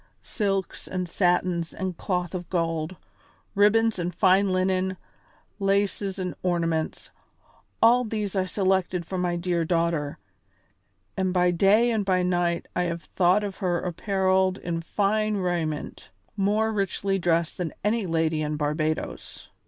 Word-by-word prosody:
Silks 195 Hz, -4 st, -2 dB
and 185 Hz, -1 st, -3 dB
satins 175 Hz, -1 st, 0 dB
and 190 Hz, -2 st, -3 dB
cloth 180 Hz, 0 st, -2 dB
of 180 Hz, -2 st, -5 dB
gold, 165 Hz, -1 st, -1 dB, 0.6 s
ribbons 215 Hz, +1 st, +3 dB
and 175 Hz, 0 st, -3 dB
fine 190 Hz, +1 st, +4 dB
linen, 185 Hz, 0 st, 0 dB, 0.6 s
laces 195 Hz, 0 st, 0 dB
and 180 Hz, -2 st, -3 dB
ornaments, 165 Hz, -3 st, -1 dB, 0.7 s
all 245 Hz, +2 st, +6 dB
these 210 Hz, -3 st, -3 dB
I 190 Hz, -1 st, +1 dB
selected 185 Hz, -2 st, 0 dB
for 185 Hz, +2 st, -4 dB
my 175 Hz, -1 st, 0 dB
dear 175 Hz, -1 st, 0 dB
daughter, 165 Hz, -3 st, 0 dB, 1.0 s
and 190 Hz, -1 st, 0 dB
by 180 Hz, -1 st, +3 dB
day 205 Hz, +7 st, +4 dB
and 220 Hz, -2 st, +1 dB
by 185 Hz, -2 st, +1 dB
night 175 Hz, -1 st, 0 dB
I 180 Hz, -, +1 dB
have 170 Hz, -1 st, -3 dB
thought 185 Hz, +3 st, +2 dB
of 200 Hz, -2 st, -5 dB
her 180 Hz, -4 st, 0 dB
apparelled 190 Hz, +1 st, +1 dB
in 170 Hz, -3 st, -3 dB
fine 210 Hz, +4 st, 0 dB
raiment, 170 Hz, -5 st, -3 dB, 0.3 s
more 210 Hz, +2 st, +1 dB
richly 195 Hz, -1 st, -1 dB
dressed 170 Hz, -1 st, 0 dB
than 175 Hz, -3 st, -2 dB
any 215 Hz, -1 st, +1 dB
lady 160 Hz, -1 st, +1 dB
in 150 Hz, 0 st, -2 dB
Barbadoes. 155 Hz, +1 st, -3 dB
185 Hz, 135 wpm, -26 LUFS, 170-195 Hz, 1.0 s, all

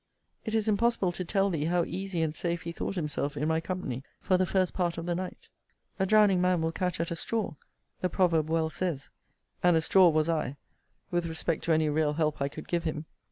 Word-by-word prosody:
it 220 Hz, -1 st, -1 dB
is 220 Hz, -1 st, +1 dB
impossible 215 Hz, -3 st, +2 dB
to 185 Hz, -, -4 dB
tell 195 Hz, +2 st, +1 dB
thee, 155 Hz, -3 st, -1 dB
how 175 Hz, +1 st, +2 dB
easy 190 Hz, -3 st, -2 dB
and 155 Hz, -1 st, -2 dB
safe 170 Hz, 0 st, -1 dB
he 170 Hz, -, -4 dB
thought 180 Hz, -, -4 dB
himself 150 Hz, -3 st, -2 dB
in 150 Hz, +2 st, 0 dB
my 160 Hz, 0 st, +1 dB
company, 160 Hz, -8 st, -4 dB, 0.2 s
for 185 Hz, -, +2 dB
the 185 Hz, 0 st, +2 dB
first 185 Hz, -1 st, +1 dB
part 175 Hz, -2 st, -1 dB
of 165 Hz, -, -4 dB
the 175 Hz, -, 0 dB
night: 180 Hz, +1 st, -5 dB, 0.5 s
A 190 Hz, -, +2 dB
drowning 205 Hz, -3 st, +5 dB
man 180 Hz, -1 st, +3 dB
will 160 Hz, 0 st, 0 dB
catch 180 Hz, 0 st, -2 dB
at 165 Hz, 0 st, -2 dB
a -, -, -1 dB
straw, 215 Hz, +4 st, -2 dB, 0.5 s
the 185 Hz, -, 0 dB
proverb 165 Hz, -4 st, +2 dB
well 160 Hz, -1 st, +1 dB
says: 160 Hz, -4 st, -3 dB, 0.5 s
and 175 Hz, -2 st, +5 dB
a -, -, +2 dB
straw 180 Hz, +2 st, +6 dB
was 155 Hz, 0 st, +2 dB
I, 155 Hz, -4 st, -1 dB, 0.5 s
with 175 Hz, -1 st, 0 dB
respect 165 Hz, 0 st, -2 dB
to 170 Hz, -, +1 dB
any 155 Hz, -1 st, +3 dB
real 150 Hz, 0 st, +1 dB
help 155 Hz, -2 st, 0 dB
I 140 Hz, -, +1 dB
could 155 Hz, +2 st, -9 dB
give 170 Hz, -1 st, 0 dB
him. 155 Hz, -1 st, -3 dB
170 Hz, 225 wpm, -29 LUFS, 160-185 Hz, 0.5 s, straw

